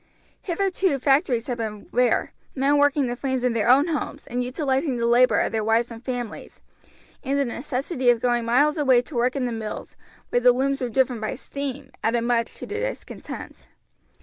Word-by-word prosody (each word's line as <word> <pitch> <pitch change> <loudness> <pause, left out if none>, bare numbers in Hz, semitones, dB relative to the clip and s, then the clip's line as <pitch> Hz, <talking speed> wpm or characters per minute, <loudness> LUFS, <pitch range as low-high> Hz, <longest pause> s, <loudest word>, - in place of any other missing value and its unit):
Hitherto 375 -3 0
factories 270 -3 +2
had 245 -2 -4
been 215 -2 -5
rare, 245 0 +1 0.2
men 280 +2 +3
working 290 -1 +3
the 240 -1 -2
frames 260 -1 -2
in 250 -2 +2
their 230 0 +1
own 280 +6 +5
homes, 300 -2 -3
and 245 +1 -2
utilizing 265 +1 -1
the 235 - 0
labor 240 +2 +4
of - - 0
their 220 -1 -1
wives 225 +2 +1
and 230 +1 -10
families, 245 -3 -6 0.6
and 275 0 0
the 280 - +2
necessity 260 +2 -1
of 240 -1 +4
going 240 0 +1
miles 290 +7 +2
away 260 -4 +4
to 295 - -14
work 245 +2 +1
in 270 -2 -1
the 245 - -2
mills, 220 -2 -6 0.3
where 245 - +2
the 250 0 +6
looms 270 +2 0
were 250 - -1
driven 255 -1 +1
by 215 +4 -3
steam, 280 +1 -6
added 235 +1 +1
much 235 -1 0
to - - -8
the 425 - -4
discontent. - - -7
250 Hz, 195 wpm, -24 LUFS, 240-280 Hz, 0.6 s, the